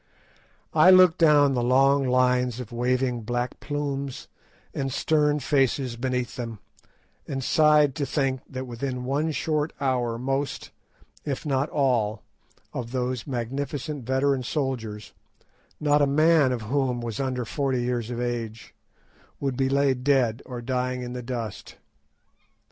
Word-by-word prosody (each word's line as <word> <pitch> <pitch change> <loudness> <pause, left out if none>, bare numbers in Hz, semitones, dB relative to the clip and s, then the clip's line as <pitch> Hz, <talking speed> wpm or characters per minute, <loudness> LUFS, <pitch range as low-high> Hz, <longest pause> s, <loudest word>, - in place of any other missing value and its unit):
I 185 - +6
looked 185 -2 +7
down 145 -4 +5
the 125 - 0
long 135 +2 +4
lines 125 -1 +2
of 125 -2 -7
waving 125 0 0
black 120 +2 -3
plumes 140 -2 -4 0.5
and 135 -1 -2
stern 150 +1 +2
faces 135 -3 +1
beneath 125 0 -2
them, 115 -3 -5 0.7
and 135 -1 -3
sighed 150 -1 +4
to 145 - 0
think 135 -2 0
that 130 0 -5
within 125 +1 -4
one 145 +5 0
short 155 0 -1
hour 125 -4 0
most, 135 +3 -3 0.5
if 140 -1 -4
not 140 0 0
all, 115 -7 0 0.5
of 120 -1 -5
those 125 -1 -2
magnificent 135 +3 -4
veteran 130 +1 +1
warriors, 110 -8 -3 0.7
not 150 -1 +3
a 145 - +4
man 155 -1 +4
of 120 -3 -3
whom 130 +1 0
was 115 -3 -5
under 130 -3 -2
forty 130 0 -1
years 120 -2 -2
of 120 -1 -4
age, 115 -2 -4 0.7
would 135 -2 -2
be 130 +1 +1
laid 135 -2 +1
dead 125 -5 +2
or 120 -2 -6
dying 125 0 -2
in 125 0 -6
the 125 - -5
dust. 120 -4 -6
130 Hz, 140 wpm, -25 LUFS, 120-140 Hz, 0.7 s, looked